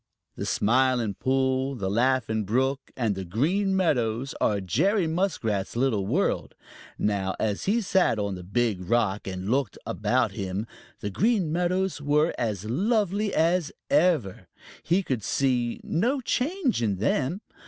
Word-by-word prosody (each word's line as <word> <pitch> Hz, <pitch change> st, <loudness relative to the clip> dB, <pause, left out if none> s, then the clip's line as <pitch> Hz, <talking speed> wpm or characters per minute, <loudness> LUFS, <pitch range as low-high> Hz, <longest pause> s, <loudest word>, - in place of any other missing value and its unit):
The -, -, -4 dB
Smiling 120 Hz, -1 st, +2 dB
Pool, 130 Hz, +3 st, 0 dB
the 100 Hz, -6 st, -3 dB
Laughing 115 Hz, 0 st, +1 dB
Brook, 130 Hz, +6 st, 0 dB
and 115 Hz, -5 st, +1 dB
the 95 Hz, 0 st, -5 dB
Green 170 Hz, -, 0 dB
Meadows 130 Hz, -8 st, 0 dB
are 105 Hz, -2 st, +2 dB
Jerry 185 Hz, -, +1 dB
Muskrat's 160 Hz, -, -1 dB
little 115 Hz, -6 st, +1 dB
world. 165 Hz, -, 0 dB, 0.4 s
Now, 100 Hz, -2 st, 0 dB
as 105 Hz, -2 st, -1 dB
he 225 Hz, +4 st, +2 dB
sat 190 Hz, -, +2 dB
on 100 Hz, -1 st, -1 dB
the 90 Hz, -, -6 dB
Big 100 Hz, +1 st, 0 dB
Rock 110 Hz, -5 st, +1 dB
and 95 Hz, 0 st, -5 dB
looked 130 Hz, -5 st, 0 dB
about -, -, 0 dB
him, 95 Hz, +2 st, -3 dB, 0.4 s
the 100 Hz, -, -3 dB
Green 200 Hz, -, +1 dB
Meadows 180 Hz, 0 st, 0 dB
were 150 Hz, +3 st, +2 dB
as 105 Hz, -4 st, -2 dB
lovely 205 Hz, -, +1 dB
as 165 Hz, -1 st, +1 dB, 0.2 s
ever. 155 Hz, -, +2 dB, 0.3 s
He 180 Hz, +4 st, +1 dB
could 125 Hz, -, -2 dB
see 125 Hz, -2 st, 0 dB
no 240 Hz, -, 0 dB
change 265 Hz, -, 0 dB
in 105 Hz, -4 st, +1 dB
them. 135 Hz, -, 0 dB
130 Hz, 145 wpm, -26 LUFS, 105-180 Hz, 0.4 s, Smiling